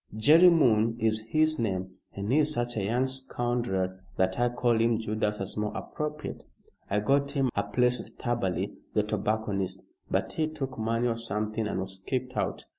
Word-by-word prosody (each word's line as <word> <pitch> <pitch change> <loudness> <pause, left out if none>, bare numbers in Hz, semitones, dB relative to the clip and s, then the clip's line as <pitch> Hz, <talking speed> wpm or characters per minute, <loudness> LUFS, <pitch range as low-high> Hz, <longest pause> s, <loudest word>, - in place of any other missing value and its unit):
Jerry 160 +10 +7
Moon 115 -8 +4
is 110 -1 +1
his 155 +3 +2
name 95 -4 -2 0.2
but 100 - -4
he's 150 +7 +3
such 120 0 -1
a 105 - -1
young 120 +6 +1
scoundrel 120 -8 -2 0.2
that 95 +3 +1
I 120 0 +3
call 120 -2 +1
him 115 0 +3
Judas 105 -1 -1
as 95 - -4
more 105 0 -2
appropriate. 150 0 -5 0.5
I 105 +1 +1
got 140 +5 +2
him 135 -4 +1
a 100 - +2
place 125 +5 +1
with - - -10
Taberley, 95 -8 -1 0.2
the - - +4
tobacconist, 100 -3 -1 0.3
but - - 0
he 155 -1 0
took 140 -4 -5
money 115 +2 +1
or 115 - 0
something 110 -1 -2
and 95 - -2
was 95 0 -6
kicked 130 -1 -3
out. - - -2
115 Hz, 180 wpm, -28 LUFS, 105-130 Hz, 0.5 s, Jerry